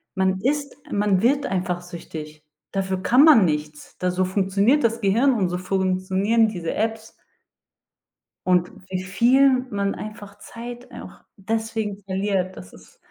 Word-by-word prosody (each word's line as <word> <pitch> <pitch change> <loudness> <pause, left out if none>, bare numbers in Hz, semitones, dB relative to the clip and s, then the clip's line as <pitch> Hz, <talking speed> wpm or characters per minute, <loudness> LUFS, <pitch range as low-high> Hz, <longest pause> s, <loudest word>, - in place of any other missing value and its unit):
Man 190 0 +1
ist 280 +3 -1
man 205 -2 +2
wird 275 +4 +2
einfach 180 -2 -2
süchtig. 155 -3 -9 0.3
Dafür 190 -1 -2
kann 250 +8 +5
man 255 - +7
nichts. 150 -1 -4
Da 180 0 0
so 185 +1 0
funktioniert 200 +8 +2
das 230 0 +1
Gehirn 230 +8 +3
und 195 -7 0
so 180 - -2
funktionieren 190 +4 +1
diese 175 -6 -4
Apps. 220 0 -3 1.3
Und 180 -1 +2 0.2
wie 185 0 -3
viel 255 +6 +3
man 200 -1 -1
einfach 205 -1 -9
Zeit 240 +1 -9
auch - - -11 0.2
deswegen 220 0 -3
verliert, 190 -1 -1
das 90 0 -11
ist - - -17
195 Hz, 140 wpm, -23 LUFS, 185-230 Hz, 1.3 s, man